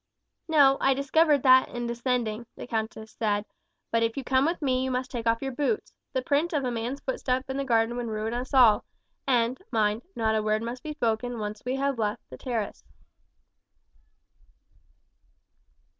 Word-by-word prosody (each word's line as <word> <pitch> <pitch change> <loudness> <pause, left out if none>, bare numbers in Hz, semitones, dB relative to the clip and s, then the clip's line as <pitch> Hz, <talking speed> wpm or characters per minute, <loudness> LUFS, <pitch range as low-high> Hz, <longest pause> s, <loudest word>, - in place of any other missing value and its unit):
"No, 280 -4 +5
I 270 0 +4
discovered 285 +1 +3
that 260 -1 +6
in 240 0 -4
descending," 235 -2 -2
the - - -8
countess 220 -1 -4
said; 205 -2 -1 0.5
"but 230 - +2
if 230 +2 0
you 275 - -2
come 260 +2 +2
with 335 +2 0
me 260 -3 +1
you 260 - -1
must 255 0 -2
take 235 -2 -3
off 230 +2 +2
your 270 - -2
boots 295 - -1 0.2
the 260 - -1
print 300 +6 +1
of 290 -3 +1
a 250 - -1
man's 240 +4 -3
footstep 260 0 -1
in 265 - -3
the 275 - 0
garden 230 -2 +2
would 240 -1 -3
ruin 220 +1 -3
us 245 +2 -4
all; 245 -6 +6 0.4
and 245 +1 +2
mind, 215 0 +1
not 220 -1 +1
a 215 - +2
word 215 +1 0
must 240 +2 -5
be 310 - -5
spoken 240 -3 -1
when 210 -1 -3
we 255 - 0
have 275 -2 -1
once 210 -1 +1
left - - -49
the - - -8
terrace." 230 -6 -3
245 Hz, 185 wpm, -27 LUFS, 225-270 Hz, 0.5 s, that